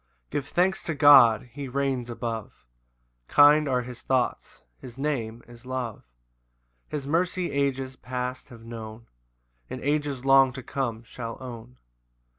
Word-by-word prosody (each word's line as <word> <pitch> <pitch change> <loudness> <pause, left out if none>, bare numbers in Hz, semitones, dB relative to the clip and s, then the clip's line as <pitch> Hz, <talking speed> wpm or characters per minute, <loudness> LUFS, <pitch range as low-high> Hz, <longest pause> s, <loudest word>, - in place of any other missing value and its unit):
1 - - -44 0.2
Give 140 - -3
thanks 185 +2 +1
to 165 - -2
God; 130 -5 +7
he 140 +1 -6
reigns 130 -2 -2
above, 115 - -6 0.6
Kind 145 0 +6
are 125 -1 +1
his 125 -1 -9
thoughts, 130 -2 -2
his 125 -1 -11
Name 120 -5 -3
is 120 0 -14
love; 125 -4 -4 0.9
His 145 -3 -4
mercy 175 +4 0
ages 135 -2 -1
past 125 0 -5
have 115 -2 -13
known, 115 0 -9 0.6
And 130 - -5
ages 145 -3 -1
long 135 -1 +6
to 130 0 -8
come 120 -5 -3
shall 115 0 -7
own. 125 -1 -9
130 Hz, 140 wpm, -26 LUFS, 120-140 Hz, 0.9 s, God